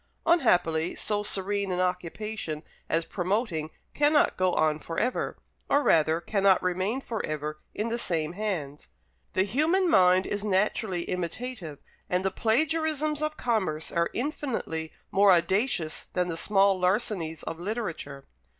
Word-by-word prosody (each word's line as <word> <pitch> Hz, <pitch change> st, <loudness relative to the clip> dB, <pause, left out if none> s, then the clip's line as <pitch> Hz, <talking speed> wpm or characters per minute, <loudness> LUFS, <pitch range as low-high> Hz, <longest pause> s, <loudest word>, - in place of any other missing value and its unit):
Unhappily, 175 Hz, -, +3 dB
so 210 Hz, -1 st, 0 dB
serene 200 Hz, -1 st, -1 dB
an 180 Hz, -, -1 dB
occupation 180 Hz, -2 st, -3 dB, 0.3 s
as 165 Hz, 0 st, +1 dB
promoting 180 Hz, -4 st, -1 dB, 0.2 s
cannot 295 Hz, +1 st, +3 dB
go 185 Hz, 0 st, +2 dB
on 155 Hz, -1 st, +2 dB
for 165 Hz, +1 st, -6 dB
ever; 250 Hz, +2 st, -1 dB, 0.3 s
or 285 Hz, +1 st, +3 dB
rather, 160 Hz, -, +3 dB
cannot 195 Hz, 0 st, +3 dB
remain 185 Hz, +7 st, 0 dB
for 230 Hz, -4 st, -4 dB
ever 155 Hz, 0 st, -4 dB, 0.2 s
in 215 Hz, +2 st, -1 dB
the 235 Hz, +1 st, -1 dB
same 165 Hz, -5 st, -1 dB
hands. 175 Hz, -8 st, -4 dB, 0.4 s
The 185 Hz, -, +3 dB
human 310 Hz, -, +2 dB
mind 185 Hz, -, +5 dB
is 205 Hz, 0 st, -3 dB
naturally 195 Hz, -2 st, 0 dB
imitative, 180 Hz, -, -4 dB, 0.3 s
and 180 Hz, +1 st, 0 dB
the 190 Hz, -, +1 dB
plagiarisms 305 Hz, -, +1 dB
of 305 Hz, 0 st, -2 dB
commerce 190 Hz, -10 st, -1 dB
are 170 Hz, 0 st, +1 dB
infinitely 240 Hz, -, -3 dB, 0.2 s
more 200 Hz, 0 st, +5 dB
audacious 180 Hz, -1 st, +1 dB
than 180 Hz, -1 st, 0 dB
the 165 Hz, -, -2 dB
small 195 Hz, +1 st, +3 dB
larcenies 180 Hz, -4 st, 0 dB
of 165 Hz, -, -5 dB
literature. 175 Hz, -, -4 dB
190 Hz, 140 wpm, -27 LUFS, 165-225 Hz, 0.4 s, mind